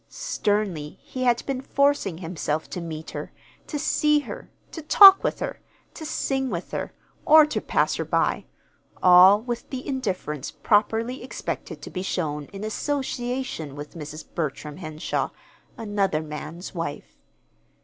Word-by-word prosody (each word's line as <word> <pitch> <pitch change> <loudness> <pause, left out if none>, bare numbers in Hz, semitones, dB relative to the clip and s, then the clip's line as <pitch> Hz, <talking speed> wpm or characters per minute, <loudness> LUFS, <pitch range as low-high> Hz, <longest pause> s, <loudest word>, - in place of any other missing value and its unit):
Sternly 195 -8 -2
he 255 -1 -4
had 240 -1 +2
been 270 -2 -2
forcing 280 - +1
himself 160 -3 -3
to 180 - -4
meet 160 -1 -6
her, - - -6 0.4
to 300 - -3
see 300 0 +2
her, - - -9 0.2
to 325 - -7
talk 390 +5 +9
with - - 0
her, - - -4 0.3
to 315 - -8
sing 265 -3 -1
with 175 -4 -5
her, - - -3 0.3
or 310 0 +8
to 300 - -2
pass - - +1
her - - -1
by - - 0 0.6
all 185 +3 +8
with 240 -1 -5
the 260 -1 -6
indifference 185 - -3
properly 225 +3 +1
expected 255 - -6
to - - -8
be 185 - -4
shown 150 -6 -2
in 200 +4 -9
association 245 - -3
with 145 0 -8
Mrs. 155 -2 -8
Bertram 150 -1 -4
Henshaw, 155 -3 -3 0.5
another 200 -7 0
man's 155 +3 -7
wife. 165 -5 -6
200 Hz, 145 wpm, -25 LUFS, 160-260 Hz, 0.6 s, talk